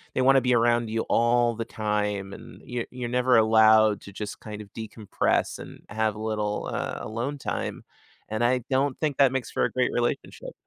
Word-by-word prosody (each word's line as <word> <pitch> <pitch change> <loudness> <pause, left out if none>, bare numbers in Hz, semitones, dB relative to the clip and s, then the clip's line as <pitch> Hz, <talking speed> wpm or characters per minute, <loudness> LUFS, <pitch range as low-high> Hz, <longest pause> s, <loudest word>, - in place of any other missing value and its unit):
they - - +2
wanna 135 +1 +5
be 125 0 +2
around 120 0 +2
you 115 +1 -1
all 120 0 +2
the 115 +1 -4
time, 105 -3 -2
and - - -12
you 120 -1 -4
you're 125 -1 -5
never 125 0 +3
allowed 110 -1 +5
to 100 - -11
just 105 +1 -6
kind 105 -1 -8
of 100 -2 -14
decompress 110 -2 -1
and - - -11
have 110 0 -1
a - - -9
little, 105 -1 -2
uh, - - -3
alone 120 +6 -4
time, 135 - -4 0.5
and 110 +2 -1
I 125 +2 +3
don't 135 0 +1
think 150 -3 -1
that 135 -2 +5
makes 130 -2 -3
for - - 0
a - - -2
great 125 -1 0
relationship. 120 0 -3
115 Hz, 195 wpm, -26 LUFS, 110-125 Hz, 0.5 s, wanna